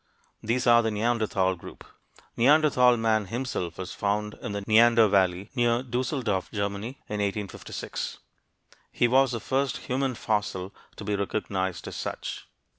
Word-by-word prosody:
These 120 Hz, +3 st, 0 dB
are 120 Hz, 0 st, +6 dB
the 115 Hz, -, 0 dB
Neanderthal 105 Hz, -4 st, +1 dB
group. 85 Hz, -, -12 dB, 0.5 s
"Neanderthal 125 Hz, -2 st, +5 dB
man" 110 Hz, -2 st, +1 dB
himself 105 Hz, -6 st, -4 dB
was 95 Hz, -1 st, -6 dB
found 105 Hz, +1 st, -1 dB
in -, -, -4 dB
the 100 Hz, -, -3 dB
Neander 115 Hz, +1 st, +6 dB
Valley, 95 Hz, 0 st, +1 dB
near 120 Hz, -1 st, +2 dB
Düsseldorf, 120 Hz, -5 st, -2 dB
Germany, 100 Hz, +4 st, -3 dB
in 105 Hz, -, -3 dB
1856. 100 Hz, -1 st, -4 dB, 0.7 s
He 120 Hz, -, +2 dB
was 130 Hz, +1 st, +4 dB
the 115 Hz, -, -2 dB
first 135 Hz, +5 st, -1 dB
human 130 Hz, 0 st, -2 dB
fossil 100 Hz, -4 st, -2 dB, 0.2 s
to -, -, -8 dB
be 105 Hz, 0 st, -1 dB
recognized 95 Hz, -3 st, -2 dB
as -, -, -6 dB
such. -, -, -5 dB
110 Hz, 140 wpm, -27 LUFS, 100-120 Hz, 0.7 s, are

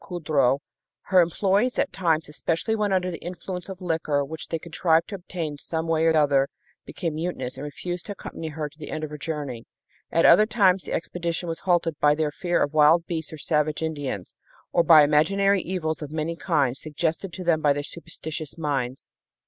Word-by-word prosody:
Coudreau, 150 Hz, -7 st, +1 dB, 0.6 s
her 185 Hz, -, +8 dB
employees 195 Hz, +8 st, +1 dB
at -, -, 0 dB
times, 165 Hz, -4 st, +1 dB
especially 165 Hz, +8 st, -1 dB
when 210 Hz, -2 st, 0 dB
under 185 Hz, -1 st, +1 dB
the 170 Hz, -, -7 dB
influence 180 Hz, +1 st, -6 dB
of 190 Hz, -1 st, -8 dB
liquor 155 Hz, -4 st, 0 dB
which 155 Hz, +1 st, -7 dB
they 165 Hz, -, -2 dB
contrived 165 Hz, 0 st, +1 dB
to -, -, -7 dB
obtain 170 Hz, -6 st, -5 dB
some 160 Hz, +2 st, -3 dB
way 165 Hz, 0 st, +2 dB
or 160 Hz, -1 st, +4 dB
other, 140 Hz, -2 st, +3 dB, 0.4 s
became 165 Hz, -3 st, -4 dB
mutinous 155 Hz, -6 st, -3 dB
and 135 Hz, -, -7 dB
refused 175 Hz, +5 st, -5 dB
to 205 Hz, -, -4 dB
accompany 165 Hz, -4 st, -7 dB
her 155 Hz, -1 st, -4 dB
to 150 Hz, +2 st, -18 dB
the 150 Hz, -, -7 dB
end 155 Hz, -, -4 dB
of 155 Hz, -, -4 dB
her 150 Hz, -, -6 dB
journey. 145 Hz, -7 st, -5 dB, 0.4 s
At 165 Hz, -, +3 dB
other 210 Hz, +5 st, +7 dB
times 195 Hz, -5 st, +3 dB
the -, -, -7 dB
expedition 170 Hz, +1 st, -2 dB
was 165 Hz, -1 st, -3 dB
halted 170 Hz, -4 st, +1 dB
by 150 Hz, 0 st, +4 dB
their 155 Hz, -1 st, 0 dB
fear 175 Hz, +3 st, 0 dB
of 145 Hz, -, -3 dB
wild 155 Hz, +2 st, +5 dB
beasts 160 Hz, -3 st, -4 dB
or 155 Hz, -, -7 dB
savage 150 Hz, +1 st, 0 dB
Indians, 145 Hz, -, -4 dB, 0.4 s
or 170 Hz, -, +5 dB
by 160 Hz, -2 st, +8 dB
imaginary 195 Hz, +7 st, +3 dB
evils 160 Hz, -4 st, -3 dB
of 150 Hz, -1 st, -6 dB
many 160 Hz, +1 st, -2 dB
kinds, 140 Hz, -7 st, 0 dB
suggested 160 Hz, +4 st, -2 dB
to 185 Hz, -, -6 dB
them 165 Hz, -3 st, +2 dB
by 145 Hz, -, +4 dB
their 145 Hz, 0 st, -1 dB
superstitious 160 Hz, -1 st, -6 dB
minds. 135 Hz, -5 st, -2 dB
160 Hz, 195 wpm, -25 LUFS, 150-175 Hz, 0.6 s, her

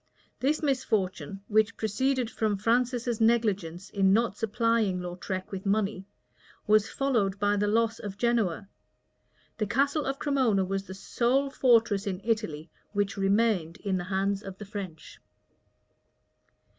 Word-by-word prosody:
This 300 Hz, +5 st, 0 dB
misfortune, 195 Hz, -, -1 dB
which 215 Hz, 0 st, +2 dB
proceeded 255 Hz, +4 st, 0 dB
from 215 Hz, -3 st, 0 dB
Francis's 240 Hz, +1 st, 0 dB
negligence 205 Hz, -6 st, +1 dB
in 195 Hz, -1 st, +3 dB
not 225 Hz, +1 st, +2 dB
supplying 225 Hz, -3 st, +1 dB
Lautrec 180 Hz, +1 st, -5 dB
with 195 Hz, -1 st, -5 dB
money,[*] 200 Hz, -1 st, 0 dB, 0.6 s
was 215 Hz, 0 st, +4 dB
followed 225 Hz, -8 st, 0 dB
by 205 Hz, 0 st, +2 dB
the 205 Hz, 0 st, +1 dB
loss 225 Hz, +1 st, +1 dB
of 200 Hz, -1 st, -7 dB
Genoa. 220 Hz, -7 st, 0 dB, 0.9 s
The 215 Hz, -, 0 dB
castle 280 Hz, +6 st, +1 dB
of 270 Hz, 0 st, -1 dB
Cremona 255 Hz, -10 st, +1 dB
was 195 Hz, +1 st, -3 dB
the 190 Hz, -, -7 dB
sole 255 Hz, +7 st, 0 dB
fortress 230 Hz, -6 st, +3 dB
in 185 Hz, -2 st, -2 dB
Italy 210 Hz, -9 st, -2 dB, 0.2 s
which 205 Hz, -1 st, 0 dB
remained 195 Hz, -4 st, +1 dB
in 195 Hz, -3 st, -1 dB
the 175 Hz, -, -4 dB
hands 195 Hz, +1 st, 0 dB
of 195 Hz, -2 st, -9 dB
the 210 Hz, -, -8 dB
French. 190 Hz, -6 st, -8 dB
210 Hz, 135 wpm, -28 LUFS, 195-235 Hz, 0.9 s, was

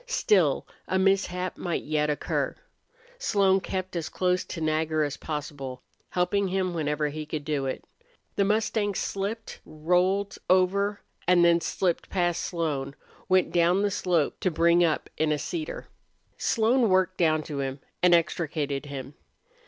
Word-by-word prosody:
Still, 185 Hz, -, +2 dB, 0.2 s
a 190 Hz, -, +1 dB
mishap 190 Hz, -1 st, +1 dB
might 175 Hz, -2 st, -2 dB
yet 150 Hz, 0 st, 0 dB
occur. 150 Hz, -, -1 dB, 0.6 s
Slone 195 Hz, -, +3 dB
kept 185 Hz, -1 st, -4 dB
as 165 Hz, -2 st, -2 dB
close 180 Hz, 0 st, 0 dB
to 170 Hz, -, -6 dB
Nagger 155 Hz, 0 st, +1 dB
as 145 Hz, -1 st, -2 dB
possible, 145 Hz, -4 st, -6 dB, 0.3 s
helping 190 Hz, +3 st, +1 dB
him 185 Hz, -1 st, -1 dB
whenever 150 Hz, -2 st, -1 dB
he 155 Hz, +1 st, -5 dB
could 150 Hz, -1 st, -5 dB
do 145 Hz, -3 st, -1 dB
it. 130 Hz, -, -4 dB, 0.5 s
The 200 Hz, -, +3 dB
mustang 210 Hz, 0 st, +1 dB
slipped, 205 Hz, +5 st, -3 dB
rolled 180 Hz, +6 st, 0 dB
over, 200 Hz, +3 st, +2 dB, 0.3 s
and 175 Hz, -1 st, +5 dB
then 170 Hz, 0 st, +4 dB
slipped 175 Hz, -1 st, -1 dB
past 175 Hz, -2 st, 0 dB
Slone, 145 Hz, -6 st, -2 dB, 0.3 s
went 185 Hz, -1 st, +3 dB
down 175 Hz, +3 st, +3 dB
the 205 Hz, -, +1 dB
slope 180 Hz, -6 st, 0 dB
to 185 Hz, -, +1 dB
bring 170 Hz, +1 st, +4 dB
up 160 Hz, -3 st, +1 dB
in 155 Hz, 0 st, +1 dB
a 150 Hz, -, +2 dB
cedar. 345 Hz, -, -5 dB, 0.5 s
Slone 230 Hz, +1 st, +2 dB
worked 185 Hz, 0 st, +2 dB
down 155 Hz, -2 st, +2 dB
to 145 Hz, -2 st, -5 dB
him 135 Hz, 0 st, -3 dB, 0.2 s
and 175 Hz, -1 st, +6 dB
extricated 150 Hz, -4 st, -1 dB
him. 135 Hz, 0 st, -7 dB
175 Hz, 150 wpm, -27 LUFS, 155-190 Hz, 0.6 s, and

